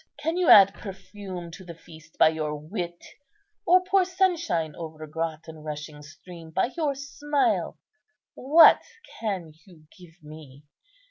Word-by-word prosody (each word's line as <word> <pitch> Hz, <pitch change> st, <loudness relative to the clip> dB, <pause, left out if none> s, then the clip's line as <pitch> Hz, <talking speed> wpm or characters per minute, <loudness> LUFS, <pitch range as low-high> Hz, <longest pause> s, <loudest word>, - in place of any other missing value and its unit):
Can 325 Hz, +2 st, -2 dB
you 360 Hz, -2 st, +1 dB
add 195 Hz, -1 st, +8 dB
perfume 190 Hz, -3 st, -9 dB
to 180 Hz, +3 st, -11 dB
the 170 Hz, -2 st, -10 dB
feast 160 Hz, -1 st, -17 dB
by -, -, +6 dB
your 155 Hz, -1 st, -3 dB
wit, 175 Hz, +3 st, -7 dB, 0.6 s
or 365 Hz, +1 st, +5 dB
pour 380 Hz, +1 st, +2 dB
sunshine 345 Hz, -, -1 dB
over 155 Hz, -2 st, -8 dB
grot 160 Hz, 0 st, -5 dB
and 160 Hz, -1 st, -11 dB
rushing 150 Hz, 0 st, -7 dB
stream 165 Hz, +2 st, -13 dB
by 190 Hz, +9 st, -1 dB
your 305 Hz, -5 st, -1 dB
smile? 285 Hz, +1 st, -1 dB, 0.6 s
What 305 Hz, +6 st, +6 dB, 0.4 s
can 190 Hz, -8 st, -4 dB
you 165 Hz, -5 st, -18 dB
give 175 Hz, -2 st, -18 dB
me? 150 Hz, -2 st, -13 dB
175 Hz, 140 wpm, -25 LUFS, -, 0.6 s, add